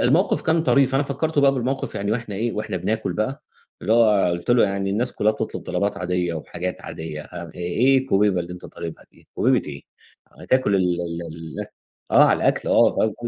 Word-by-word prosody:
الموقِف 160 +10 +2
كان 160 0 +2
طريف، 140 -4 +3
أنا 135 - +3
فكّرته 145 +2 -1
بقى 140 -1 +5
بالموقِف 130 +1 -2
يعني 100 +1 -1
وإحنا 115 -3 -3
إيه، 115 +3 -1
وإحنا 105 -3 -3
بناكُل 100 +1 -2
بقى 110 +9 -3 0.4
اللي 110 - +1
هو 105 -5 +4
قُلت 85 +6 -3
له: 120 -2 +5
"يعني 100 -1 -1
الناس 120 +5 0
كُلّها 110 +1 +2
بتطلُب - - -5
طلبات 100 0 -2
عادية 90 -1 -1
وحاجات 85 +3 -5
عادية 80 -2 -6
أ - - -16
آآ 85 -3 -10
إيه 110 +10 +2
الكُوبيبة 105 -7 +2
اللي 85 +1 -6
أنت 90 - -9
طالبها 85 -1 -8
دي؟ - - -24
كُوبيبة - - +2
إيه؟ - - -8 0.6
هتاكل 130 -6 +1
ال 95 - +2 0.2
ال 85 0 -4 0.4
ال" - - -5 0.5
آه، - - +8
على - - +4
الأكل - - +1
آه، 110 -2 +3
105 Hz, 195 wpm, -22 LUFS, 90-130 Hz, 0.6 s, آه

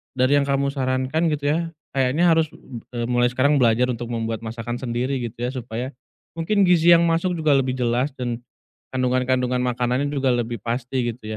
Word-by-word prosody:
dari 130 +3 +3
yang 140 - -1
kamu 140 0 +1
sarankan 130 +4 0
gitu 145 -1 -3
ya, 160 - +1 0.3
kayaknya 140 +6 +2
harus, 160 -1 +3 0.5
e 120 - -1
b - - 0
mulai 120 0 +3
sekarang 140 +3 +2
belajar 125 +1 +3
untuk 120 0 -5
membuat 115 -1 -2
masakan 115 +1 -5
sendiri 130 +2 -2
gitu 120 -2 -6
ya. 125 - -1
Supaya 125 0 -5 0.5
mungkin 200 +5 +2
gizi 175 -2 +5
yang 170 - +4
masuk 170 +2 +1
juga 155 -2 +1
lebih 130 -1 0
jelas 125 +3 0
dan 120 -2 -3 0.5
kandungan-kandungan 125 0 0
makanannya 125 +3 0
juga 135 -3 +1
lebih 120 -1 -2
pasti 120 +1 -2
gitu 110 -2 -7
130 Hz, 180 wpm, -22 LUFS, 120-140 Hz, 0.5 s, gizi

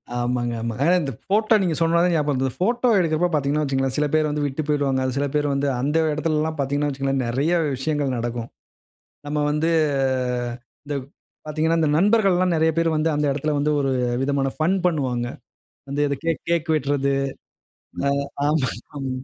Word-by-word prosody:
ஆமாங்க, 120 0 -1
ஆமாங்க. 115 0 -4
ஆனா 175 - +4
இந்த 140 -3 -3
ஃபோட்டோ 215 +3 +3
நீங்க 170 -4 0
சொன்னனா 165 0 +3
தான் 180 - +2
ஞாபகம் 150 -2 0
வருது. 135 -1 0
இந்த 125 - -6
ஃபோட்டோ 240 +6 +2
எடுக்குறப்போ 165 +1 +1
பாத்தீங்கன்னா 145 +1 +1
வச்சுக்கோங்களேன். 135 -2 -1
சில 150 - +2
பேர் 155 -1 +3
வந்து 150 0 -1
விட்டு 145 +2 -2
போயிடுவாங்க 140 -3 +1
அது 130 -1 -2
சில 145 +1 +1
பேர் 145 0 +2
வந்து 140 +1 0
அந்த 150 +4 +1 0.2
இடத்துலலாம் 155 +1 -1
பாத்தீங்கன்னா 145 +2 0
வச்சுக்கோங்களேன், 135 -1 -1
நெறைய 135 +8 0 0.2
விஷயங்கள் 140 0 -1
நடக்கும். 120 0 -4 0.8
நம்ம 150 +1 -2
வந்து 160 +3 +1 1.1
இந்த 145 - -3 0.5
பாத்தீங்கன்னா, 160 +2 +1
இந்த 155 -2 +2
நண்பர்கள்லாம் 190 -3 +3
நெறைய 160 0 +3
பேரு 165 0 +3
வந்து, 155 +1 +1
அந்த 150 0 +1
இடத்துல 145 +2 -1
வந்து 150 +1 +1
ஒரு 135 -1 0 0.3
விதமான 140 -1 0
ஃபன் 160 +5 +2
பண்ணுவாங்க. 130 -7 -1 0.6
வந்து 140 +1 -2
இது 140 - -1
கேக் 165 -1 -1
கேக் 170 -1 0
வெட்டுறது. 140 -1 0 0.9
அ 140 - +3 0.4
ஆமாங்க, 150 -4 +2 0.3
ஆமா. 135 -2 -3
150 Hz, 170 wpm, -23 LUFS, 135-160 Hz, 1.1 s, ஆனா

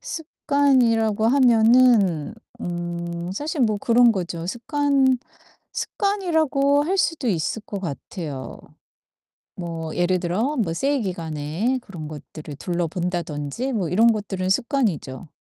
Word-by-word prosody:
습관이라고 255 -9 +1
하면은 230 - +4 0.3
음 175 0 -4
사실 295 - -3
뭐 215 -4 +2
그런 235 +1 +5
거죠. 175 -3 -4
습관 270 - +1 0.6
습관이라고 320 -8 +1
할 375 +5 0
수도 325 -8 0
있을 195 +3 -1
것 200 - -5
같아요. 145 -4 -6 1.0
뭐 165 -2 -5
예를 180 +1 +2
들어 210 - -1
뭐 175 -8 0
세일 275 +6 0
기간에 170 - -2
그런 170 -8 -8
것들을 150 0 -9
둘러본다든지 175 - -3
뭐 185 -8 -1
이런 225 +6 +5
것들은 190 -3 -3
습관이죠. 195 - -1
205 Hz, 250 characters per minute, -23 LUFS, 170-260 Hz, 1.0 s, 그런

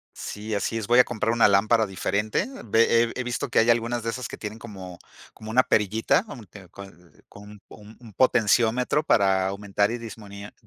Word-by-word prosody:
Sí, 105 +1 -7
así 100 +3 -2
es. 110 -3 -5
Voy 120 +1 +4
a - - +8
comprar 115 -1 -2
una 115 0 +4
lámpara 110 +3 +3
diferente. 100 - -2 0.2
Ve 115 +1 +3
he - - -6
he - - -1
visto 125 0 -4
que - - +2
hay 115 - +3
algunas 120 0 +1
de 115 - -2
esas 125 +1 -5
que - - -9
tienen 110 +1 -7
como 95 -6 -10 0.3
como 110 - -11
una 130 +3 +4
perillita 110 - +1
como 135 - -10
que 95 0 -15
con 100 +3 -11
l 90 -3 -22
con 105 0 -14
un 105 - -15
po - - -14
un 110 +1 -15
potenciómetro 120 +4 +2
para 95 -8 +2
aumentar 100 +1 -1
y 120 - -3
dismunir 105 -3 -10
110 Hz, 210 wpm, -24 LUFS, 100-115 Hz, 0.3 s, a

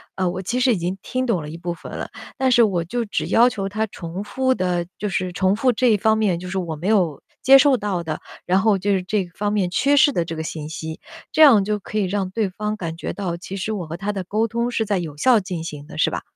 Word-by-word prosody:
呃， 185 -1 0
我 185 +1 -4
其 240 +7 -2
实 255 0 +4
已 - - -1
经 175 +3 -3
听 255 0 -2
懂 220 -9 0
了 150 - -7
一 165 - -7
部 175 0 -4
分 - - -11
了， - - -5 0.3
但 260 -1 +2
是 240 -1 +6
我 180 -6 +1
就 235 +7 -3
只 205 - -2
要 235 +2 +5
求 195 -4 -4
他 215 +2 -1
重 175 +1 -6
复 260 +4 0
的 180 -2 -1
就 210 - -3
是 185 0 -2
重 190 +2 +1
复 250 +3 +2
这 250 +2 +1
一 215 - +4
方 220 +2 +2
面 190 -6 +1
就 180 0 -7
是 190 - -3
我 170 -4 -3
没 170 +6 -5
有 180 -9 +2 0.2
接 270 +1 +9
受 275 -1 +5
到 195 -5 -2
的， 155 -1 -4 0.3
然 185 +2 +3
后 215 -3 +3
就 205 +2 -1
是 185 -1 0
这 195 0 -1
方 205 0 -1
面 195 -4 +1
缺 280 +10 +2
失 285 +1 +6
的 170 -9 -1
这 165 0 -5
个 160 - -4
信 155 -1 -5
息。 160 +1 -6 0.3
这 315 - +2
样 240 -10 +8
就 210 +1 -1
可 215 - -6
以 195 - +1
让 190 0 -1
对 210 -2 0
方 210 +3 -3
感 165 -5 -5
觉 - - -4
到， 175 -4 -3
其 185 +2 -8
实 215 +3 -3
我 185 -5 -4
和 165 - -6
他 205 +3 -2
的 195 -2 -4
沟 215 +5 0
通 235 +2 -1
是 220 -2 0
在 205 -1 0
有 160 -5 -5
效 240 +5 +5
进 180 -4 -5
行 150 -3 -7
的， - - -11
是 - - +3
吧？ - - -4
195 Hz, 305 characters per minute, -22 LUFS, 175-220 Hz, 0.3 s, 接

